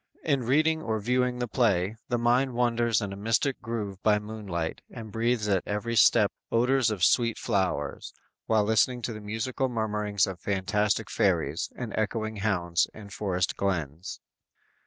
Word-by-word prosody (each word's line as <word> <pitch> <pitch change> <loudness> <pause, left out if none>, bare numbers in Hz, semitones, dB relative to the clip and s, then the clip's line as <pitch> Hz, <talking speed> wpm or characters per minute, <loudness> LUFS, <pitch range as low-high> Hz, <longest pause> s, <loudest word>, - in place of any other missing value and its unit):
In 140 -4 +1
reading 155 +6 +2
or 110 -6 -2
viewing 125 +3 0
the 125 0 -2
play, 105 -5 +1
the 120 - +1
mind 120 +2 +2
wanders 120 -2 +2
in 100 -1 -4
a - - -6
mystic 115 +7 0
grove 105 -5 -4
by 105 -1 +4
moonlight 105 -6 -4
and 110 -2 -9
breathes 115 0 0
at 95 -3 +2
every 105 +3 -2
step 105 -1 +5 0.2
odors 125 +1 +3
of 105 -5 -3
sweet 115 +1 +3
flowers, 95 -9 -1 0.4
while 110 -2 +3
listening 110 +3 +2
to 115 - -2
the 105 - -8
musical 115 +5 -2
murmurings 105 -3 0
of 95 -2 -6
fantastic 100 +1 0
fairies 75 +4 0
and 120 -3 -5
echoing 110 0 -2
hounds 90 -5 +1
in 105 -2 -11
forest 90 -3 -1
glens. 85 -3 -3
110 Hz, 155 wpm, -27 LUFS, 100-120 Hz, 0.4 s, step